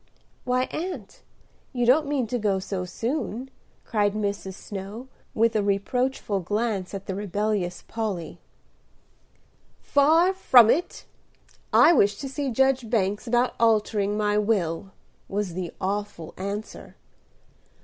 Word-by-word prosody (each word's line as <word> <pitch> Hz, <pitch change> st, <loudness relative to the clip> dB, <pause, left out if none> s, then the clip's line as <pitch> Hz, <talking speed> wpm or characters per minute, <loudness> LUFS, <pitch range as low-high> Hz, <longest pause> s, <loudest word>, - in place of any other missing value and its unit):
"Why, 250 Hz, 0 st, +2 dB
aunt, 315 Hz, -, -6 dB, 0.5 s
you 245 Hz, -2 st, 0 dB
don't 285 Hz, +5 st, +4 dB
mean 280 Hz, -4 st, 0 dB
to 245 Hz, +2 st, -2 dB
go 205 Hz, -3 st, +1 dB
so 190 Hz, -1 st, -4 dB
soon?" 240 Hz, -, -3 dB, 0.3 s
cried 205 Hz, -3 st, +1 dB
Mrs. 200 Hz, -2 st, -3 dB
Snow, 205 Hz, +7 st, -8 dB, 0.3 s
with 225 Hz, +1 st, +2 dB
a 215 Hz, -, +3 dB
reproachful 205 Hz, +2 st, 0 dB
glance 205 Hz, 0 st, -2 dB
at 195 Hz, -, -7 dB
the 190 Hz, -, -3 dB
rebellious 200 Hz, -1 st, -2 dB
Polly. 210 Hz, -7 st, -4 dB, 1.4 s
"Far 320 Hz, +6 st, +4 dB
from 245 Hz, -, +6 dB
it. 350 Hz, +4 st, -2 dB, 0.7 s
I 345 Hz, -, +7 dB
wish 205 Hz, -8 st, +4 dB
to 275 Hz, -, -5 dB
see 275 Hz, +1 st, -3 dB
Judge 265 Hz, -1 st, +2 dB
Banks 205 Hz, 0 st, 0 dB
about 240 Hz, +2 st, +2 dB
altering 210 Hz, -2 st, +2 dB
my 210 Hz, 0 st, +2 dB
will," 195 Hz, -4 st, 0 dB, 0.4 s
was 200 Hz, -3 st, -2 dB
the 180 Hz, -1 st, -4 dB
awful 200 Hz, -3 st, -3 dB
answer. 200 Hz, +3 st, -6 dB
215 Hz, 125 wpm, -25 LUFS, 200-250 Hz, 1.4 s, I